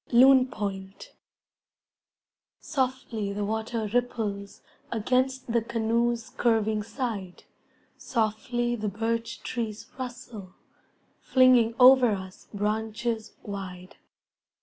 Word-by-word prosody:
Loon 260 Hz, +1 st, +7 dB
Point 195 Hz, -4 st, -6 dB, 1.5 s
Softly 255 Hz, -7 st, -2 dB
the 205 Hz, 0 st, -2 dB
water 220 Hz, +1 st, -2 dB
ripples 215 Hz, -5 st, -2 dB, 0.3 s
Against 255 Hz, +3 st, 0 dB
the 235 Hz, -, +3 dB
canoe's 235 Hz, +1 st, 0 dB
curving 220 Hz, -4 st, +1 dB
side, 210 Hz, -6 st, -5 dB, 0.6 s
Softly 240 Hz, +1 st, -1 dB
the 215 Hz, -2 st, -3 dB
birch 230 Hz, +2 st, -3 dB
trees 225 Hz, -2 st, -4 dB
rustle 230 Hz, -6 st, -8 dB, 0.6 s
Flinging 250 Hz, -3 st, +4 dB
over 250 Hz, -2 st, +7 dB
us 190 Hz, -1 st, -8 dB
branches 220 Hz, +2 st, -2 dB
wide. 185 Hz, -3 st, -7 dB
225 Hz, 85 wpm, -27 LUFS, 210-245 Hz, 1.5 s, Loon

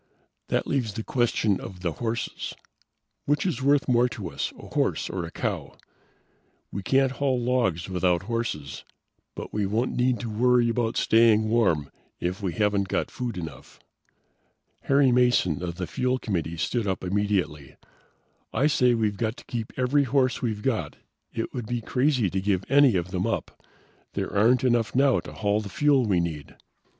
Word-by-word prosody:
"That -, -, 0 dB
leaves 120 Hz, -7 st, -1 dB
the 110 Hz, -, -3 dB
question 115 Hz, -5 st, +1 dB
of 90 Hz, -2 st, -9 dB
the 85 Hz, -2 st, -1 dB
horses. 115 Hz, +6 st, -4 dB, 0.7 s
Which 145 Hz, +3 st, +1 dB
is 155 Hz, -8 st, -1 dB
worth 140 Hz, +1 st, +3 dB
more 125 Hz, -1 st, +3 dB
to 100 Hz, -7 st, -6 dB
us: 70 Hz, -, -3 dB
a -, -, -11 dB
horse -, -, 0 dB
or 90 Hz, -1 st, -3 dB
a 80 Hz, -, -8 dB
cow? -, -, -4 dB, 0.9 s
We 100 Hz, -, -4 dB
can't 135 Hz, +6 st, +2 dB
haul 135 Hz, -2 st, 0 dB
logs 120 Hz, -9 st, 0 dB
without 90 Hz, -1 st, +1 dB
horses, 110 Hz, -, -4 dB, 0.5 s
but -, -, -7 dB
we 105 Hz, -2 st, 0 dB
won't 115 Hz, +5 st, -1 dB
need 125 Hz, -2 st, +1 dB
to 120 Hz, -, -4 dB
worry 120 Hz, +2 st, +3 dB
about 115 Hz, -1 st, -1 dB
staying 110 Hz, -1 st, +4 dB
warm 90 Hz, -11 st, +2 dB, 0.3 s
if 90 Hz, +4 st, -3 dB
we 95 Hz, -4 st, -2 dB
haven't 105 Hz, -2 st, +1 dB
got -, -, -1 dB
food 120 Hz, -5 st, -4 dB
enough." 80 Hz, -4 st, -8 dB, 1.1 s
Harry 140 Hz, -1 st, +4 dB
Mason 120 Hz, -, +3 dB
of 85 Hz, -2 st, -4 dB
the 90 Hz, -, -3 dB
fuel 125 Hz, +7 st, 0 dB
committee 85 Hz, -8 st, -3 dB
stood 105 Hz, +7 st, -1 dB
up 95 Hz, -1 st, -2 dB
immediately. 90 Hz, -7 st, -1 dB, 0.8 s
"I 140 Hz, -, +1 dB
say 125 Hz, -5 st, +3 dB
we've 105 Hz, -3 st, 0 dB
got 110 Hz, 0 st, -2 dB
to -, -, -13 dB
keep 115 Hz, -2 st, -4 dB
every 135 Hz, +3 st, +2 dB
horse 130 Hz, -1 st, +1 dB
we've 110 Hz, -4 st, -2 dB
got. 130 Hz, -5 st, -1 dB, 0.4 s
It 115 Hz, -, -4 dB
would 120 Hz, -4 st, -5 dB
be 120 Hz, +1 st, -1 dB
crazy 125 Hz, 0 st, +1 dB
to 95 Hz, -, -1 dB
give 95 Hz, -1 st, 0 dB
any 135 Hz, -4 st, +5 dB
of 90 Hz, 0 st, -1 dB
them 90 Hz, -1 st, -1 dB
up. -, -, -4 dB, 0.5 s
There -, -, -3 dB
aren't 115 Hz, +5 st, +4 dB
enough 120 Hz, -3 st, +1 dB
now 135 Hz, 0 st, +4 dB
to -, -, -9 dB
haul 105 Hz, 0 st, 0 dB
the 105 Hz, -, -7 dB
fuel 140 Hz, +1 st, +3 dB
we 95 Hz, -4 st, +2 dB
need." 80 Hz, -4 st, -4 dB
110 Hz, 175 wpm, -26 LUFS, 95-125 Hz, 1.1 s, any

